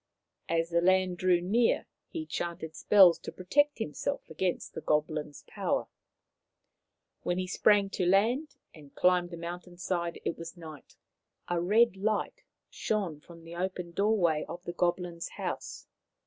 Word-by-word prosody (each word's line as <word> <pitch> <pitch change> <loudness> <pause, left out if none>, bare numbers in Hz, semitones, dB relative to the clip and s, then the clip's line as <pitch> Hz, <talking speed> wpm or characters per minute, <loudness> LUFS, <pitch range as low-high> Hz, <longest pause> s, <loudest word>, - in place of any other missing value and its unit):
As 165 +1 0
the 170 0 +3
land 185 0 +3
drew 180 -2 +3
near 225 +6 +2 0.2
he 320 -2 -5
chanted 170 - -4
spells 185 +1 +6
to - - -7
protect 290 +11 +1
himself 230 - -3
against 175 +3 -2
the - - -6
goblin's 150 -1 -1
power. - - -1 1.4
When 175 - -1
he 185 - -1
sprang 200 +1 +3
to 180 -3 0
land 240 - +2 0.2
and 145 -3 -15
climbed 180 -1 +3
the 170 - -7
mountain 175 +1 -7
side 175 -2 -2
it 170 - -2
was 165 +2 -8
night. 155 -4 -11 0.5
A 175 -1 +1
red 210 +3 +4
light 215 - -1 0.3
shone 195 -9 -2
from 165 +2 -15
the 165 +1 -9
open 180 -1 -3
doorway 175 -5 +2
of 175 - -7
the 175 - -5
goblin's 175 -1 -1
house. - - -5
180 Hz, 150 wpm, -30 LUFS, 170-195 Hz, 1.4 s, spells